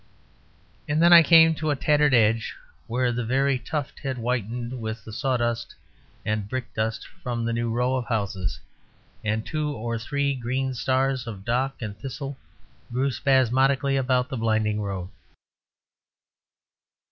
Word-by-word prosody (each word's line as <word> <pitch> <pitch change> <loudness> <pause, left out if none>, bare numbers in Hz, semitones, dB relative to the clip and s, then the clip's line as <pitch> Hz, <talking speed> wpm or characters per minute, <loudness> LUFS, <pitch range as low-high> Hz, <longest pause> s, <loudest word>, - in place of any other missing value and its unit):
And 150 +1 +1
then 170 +1 +7
I 170 - +11
came 165 0 +7
to 155 0 -2
a 145 - +2
tattered 150 -1 +3
edge 115 -1 +2 0.3
where 125 +1 +1
the 120 0 -2
very 135 +3 +1
tuft 145 +1 -4
had 135 -2 -3
whitened 120 +1 -3
with 110 0 -5
the 110 - -9
sawdust 120 -2 -1 0.5
and 105 -2 -1
brick 130 0 -4
dust 110 0 -2 0.2
from 120 -2 -2
the 115 - 0
new 115 0 -1
row 125 +3 +1
of 125 -2 -2
houses; 100 - -2 0.6
and 110 +1 -1
two 155 -1 -2
or 115 -4 -3
three 140 +4 -1
green 130 +1 -2
stars 130 0 0
of 100 -3 -7
dock 130 +3 0
and 105 -2 -5
thistle 135 +3 -6 0.6
grew 130 +3 +1
spasmodically 135 +1 +2
about 130 -1 +1
the 130 - -4
blinding 110 -2 +1
road. 95 -3 -4
125 Hz, 145 wpm, -25 LUFS, 115-135 Hz, 0.6 s, I